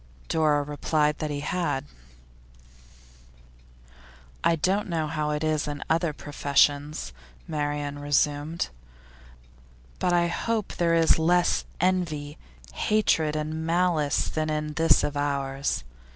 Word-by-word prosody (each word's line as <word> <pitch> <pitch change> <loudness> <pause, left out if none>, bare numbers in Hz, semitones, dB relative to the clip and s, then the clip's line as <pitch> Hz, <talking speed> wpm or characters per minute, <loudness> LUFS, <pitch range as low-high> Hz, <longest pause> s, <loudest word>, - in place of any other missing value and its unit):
Dora 150 -2 +2
replied 150 +1 0
that 155 - -2
he 145 -1 -3
had. 160 -3 -1 2.6
'I 165 - +4
don't 190 +5 0
know 165 -2 0
how 150 0 -2
it 150 +1 -1
is 155 -1 0
in 145 -1 -4
other 165 0 +2
professions,' 145 - 0 0.3
Marian 145 -1 -2
resumed, 145 +2 0 1.3
'but 180 - +1
I 175 -1 +3
hope 220 +5 -2
there 170 -1 +2
is 165 -1 +4
less 175 +2 +2
envy, 160 -5 -1 0.3
hatred 165 -8 +1
and 155 +1 -3
malice 165 -3 +1
than 155 0 -2
in 150 0 -2
this 165 +2 +4
of 145 - -2
ours. 140 - -1
155 Hz, 115 wpm, -26 LUFS, 145-165 Hz, 2.6 s, I